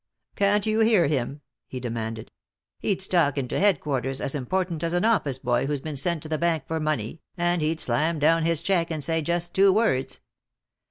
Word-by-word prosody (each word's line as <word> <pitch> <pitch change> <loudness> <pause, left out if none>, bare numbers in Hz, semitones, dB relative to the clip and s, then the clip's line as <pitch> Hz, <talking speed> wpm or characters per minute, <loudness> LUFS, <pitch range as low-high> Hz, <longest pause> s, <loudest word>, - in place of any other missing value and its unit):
"Can't 200 0 +2
you 215 0 +1
hear 220 -5 +4
him?" 140 0 -2 0.3
he 130 - -6
demanded. 115 -2 -5 0.5
"He'd 195 -2 0
stalk 170 -7 +2
into 130 -3 -2
headquarters 140 -9 +1
as 135 - -2
important 170 +4 -2
as 170 0 -1
an 175 +3 +1
office 175 - +1
boy 125 0 0
who's 145 -2 -2
been 155 0 -5
sent 160 +3 0
to 155 - -8
the 155 -1 -1
bank 165 -4 +1
for 160 +2 -3
money, 155 -2 -2 0.2
and 175 -1 +1
he'd 155 +1 0
slam 155 +7 0
down 160 +2 +3
his 165 -1 0
check 175 -3 +1
and 155 -3 -3
say 165 +1 0
just 175 +2 -2
two 195 0 +5
words." 190 - 0
160 Hz, 195 wpm, -25 LUFS, 140-175 Hz, 0.5 s, two